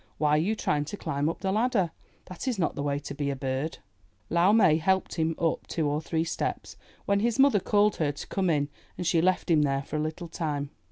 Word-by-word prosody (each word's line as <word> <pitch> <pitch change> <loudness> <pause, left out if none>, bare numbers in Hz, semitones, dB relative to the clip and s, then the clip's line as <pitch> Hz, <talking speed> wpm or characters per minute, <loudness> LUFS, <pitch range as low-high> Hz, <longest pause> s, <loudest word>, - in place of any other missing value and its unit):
Why 150 -1 +2
are 150 - +5
you 210 +6 0
trying 145 -8 0
to 180 +7 -6
climb 140 -2 -1
up 165 - -5
the 190 -1 0
ladder? 215 -5 +1 0.3
That 185 +8 -8
is 250 -4 0
not 170 - 0
the 140 - -4
way 140 0 0
to 145 - -6
be 140 0 -2
a 140 - -1
bird." 135 +3 -3 0.5
Lau 170 +3 +4
Mai 190 -8 +5
helped 190 +3 +1
him 160 -1 0
up 165 -1 -1
two 160 -3 -1
or 145 +1 0
three 160 0 -1
steps, 165 - -3 0.3
when 200 0 +2
his 235 +2 +1
mother 270 -6 +5
called 205 +2 +2
her 150 -3 +1
to 145 - -8
come 190 -2 -1
in, 145 -3 +1 0.3
and 180 - -4
she 170 -1 +3
left 185 0 +1
him 155 -2 +5
there 135 -1 +1
for 150 - -4
a - - -1
little 155 +3 -3
time. 150 -4 -3
165 Hz, 240 wpm, -27 LUFS, 145-190 Hz, 0.5 s, are